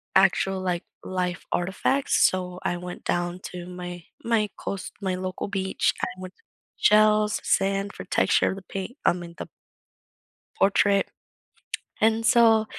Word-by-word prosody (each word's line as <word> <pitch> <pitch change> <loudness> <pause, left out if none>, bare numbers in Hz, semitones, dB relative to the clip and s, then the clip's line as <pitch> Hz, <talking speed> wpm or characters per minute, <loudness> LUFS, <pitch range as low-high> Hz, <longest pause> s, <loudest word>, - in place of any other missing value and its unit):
actual, 190 0 +4
like, 180 -1 -1 0.2
life 180 -1 -2
artifacts, 190 +10 +2
so 180 -1 -3
I 175 - 0
went 180 0 -8
down 175 +1 -1
to 175 -1 -7
my 180 -1 -7 0.2
my 225 -3 +1
coast 195 -2 -5
my 190 -2 -1
local 185 +1 -4
beach, 190 -1 0
I - - +1
wanted 185 0 -8 0.4
shells, 215 0 +4
sand 195 +1 +1
for - - -8
texture - - +3
of - - -4
the 195 - -9
paint 195 +6 -5
I - - +6
mean, 170 -1 -8
the - - -5 1.1
portrait. 200 0 +3 0.9
And 225 +1 +3
so 225 -3 +5
190 Hz, 140 wpm, -25 LUFS, 180-210 Hz, 1.1 s, I